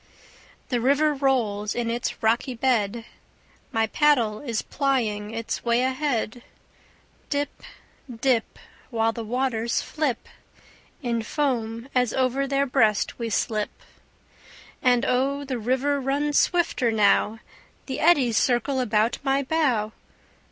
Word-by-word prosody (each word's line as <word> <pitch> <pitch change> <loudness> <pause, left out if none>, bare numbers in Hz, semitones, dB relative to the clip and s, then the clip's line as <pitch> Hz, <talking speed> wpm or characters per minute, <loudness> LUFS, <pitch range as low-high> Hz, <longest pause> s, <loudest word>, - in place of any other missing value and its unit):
The 245 -3 0
river 285 +4 +3
rolls 235 -7 0
in 235 -1 -1
its 235 -1 -3
rocky 235 +3 +1
bed; 230 -3 0 0.7
My 225 0 +2
paddle 235 -4 +2
is 235 -6 -3
plying 230 -7 -1
its 230 0 -4
way 235 +1 +2
ahead; 260 -3 -1 0.9
Dip, 285 0 -2 0.5
dip, 240 -1 0 0.3
While 225 -2 +1
the 230 0 -6
waters 235 0 -1
flip 295 -7 -2 0.8
In 235 -2 0
foam 230 -2 -2
as 250 -3 +1
over 265 +1 +1
their 275 0 +1
breast 230 -6 +1
we 230 -1 -2
slip. 215 -1 -1 1.1
And 245 -1 +3
oh, 275 +3 0
the 260 -3 -3
river 265 +5 0
runs 285 +2 +1
swifter 335 -9 +1
now; 210 0 +3 0.5
The 265 - -4
eddies 275 -9 +4
circle 255 +2 +1
about 225 -2 +1
my 275 0 +1
bow. 260 -8 +1
245 Hz, 120 wpm, -25 LUFS, 225-275 Hz, 1.1 s, eddies